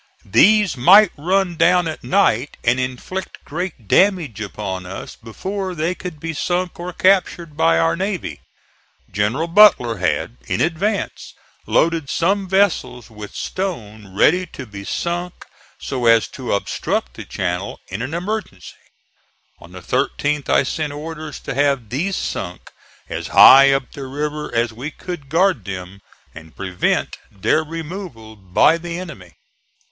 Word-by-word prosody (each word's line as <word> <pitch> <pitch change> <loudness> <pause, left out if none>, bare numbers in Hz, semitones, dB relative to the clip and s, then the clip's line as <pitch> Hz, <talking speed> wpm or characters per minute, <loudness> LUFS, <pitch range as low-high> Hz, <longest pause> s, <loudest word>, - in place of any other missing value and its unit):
These 205 - +4
might 190 - +7
run 180 +3 0
down 175 +1 +4
at 160 - -6
night 150 - +1
and 125 +2 +2
inflict 130 +9 -5
great 165 - -5
damage 170 - +2
upon 95 -3 -5
us 95 - -8
before 190 - -5
they 165 +2 -1
could 180 -4 -8
be 165 +2 -4
sunk 175 +3 -2
or 175 +1 -5
captured 180 -4 +1
by 80 - +3
our 80 0 +2
navy. 190 0 -4 0.7
General 105 - 0
Butler 165 - +5
had, 95 +6 -1
in - - -1
advance, 190 +5 -2 0.3
loaded 165 -4 +1
some 190 +4 0
vessels 175 - 0
with 105 -2 -10
stone 110 - -5
ready 180 - +3
to 140 -5 -9
be 100 -3 -9
sunk 175 - -3 0.4
so 125 -3 -2
as 115 -1 +5
to 130 -2 -6
obstruct 60 -9 -2
the - - -8
channel 90 0 -4
in 95 +4 -5
an 135 +7 -4
emergency. 180 - -5 0.9
On - - -15
the - - -10
13th 145 -1 -1
I - - +4
sent 150 +1 -3
orders 155 -1 -7
to - - -5
have 140 -5 +1
these 175 - -1
sunk 90 -1 -5 0.4
as - - -5
high 135 +1 +8
up 135 -2 -1
the 140 -2 -7
river 150 +2 -4
as 115 -1 0
we 130 +6 -6
could 160 -4 -8
guard 170 - +2
them, 95 +1 -7 0.3
and 80 0 -13
prevent 95 -2 -1
their 125 +11 +1
removal 160 - -8
by 100 - +2
the 170 0 -5
enemy. 100 - -10
150 Hz, 145 wpm, -20 LUFS, 110-180 Hz, 0.9 s, high